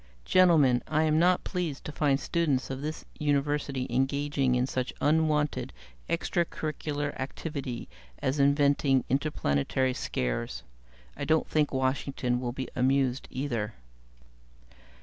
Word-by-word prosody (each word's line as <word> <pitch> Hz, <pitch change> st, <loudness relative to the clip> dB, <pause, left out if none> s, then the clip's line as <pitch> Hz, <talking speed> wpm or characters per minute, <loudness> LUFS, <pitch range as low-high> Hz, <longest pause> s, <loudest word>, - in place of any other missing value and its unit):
"Gentlemen, 155 Hz, -9 st, +5 dB
I 155 Hz, -, +2 dB
am 155 Hz, 0 st, +3 dB
not 180 Hz, +1 st, +3 dB
pleased 175 Hz, -7 st, -3 dB
to -, -, -4 dB
find 145 Hz, -2 st, +1 dB
students 145 Hz, -4 st, 0 dB
of 135 Hz, 0 st, -4 dB
this 155 Hz, +2 st, -5 dB
University 145 Hz, -2 st, 0 dB
engaging 135 Hz, 0 st, +1 dB
in 125 Hz, 0 st, +2 dB
such 130 Hz, -1 st, -2 dB
unwanted 150 Hz, -1 st, +1 dB, 0.4 s
extra 170 Hz, +1 st, +1 dB
curricular 150 Hz, -3 st, -3 dB
activity 135 Hz, -2 st, -5 dB, 0.3 s
as 135 Hz, +2 st, -1 dB
inventing 140 Hz, -1 st, +3 dB
interplanetary 130 Hz, -, 0 dB
scares. -, -, -3 dB, 0.5 s
I -, -, -5 dB
don't 160 Hz, 0 st, +2 dB
think 150 Hz, -2 st, +1 dB
Washington 130 Hz, -1 st, 0 dB
will 120 Hz, -1 st, -2 dB
be 130 Hz, +1 st, -5 dB
amused, 130 Hz, 0 st, +1 dB
either." 120 Hz, -5 st, -3 dB
140 Hz, 120 wpm, -28 LUFS, 130-150 Hz, 0.5 s, Gentlemen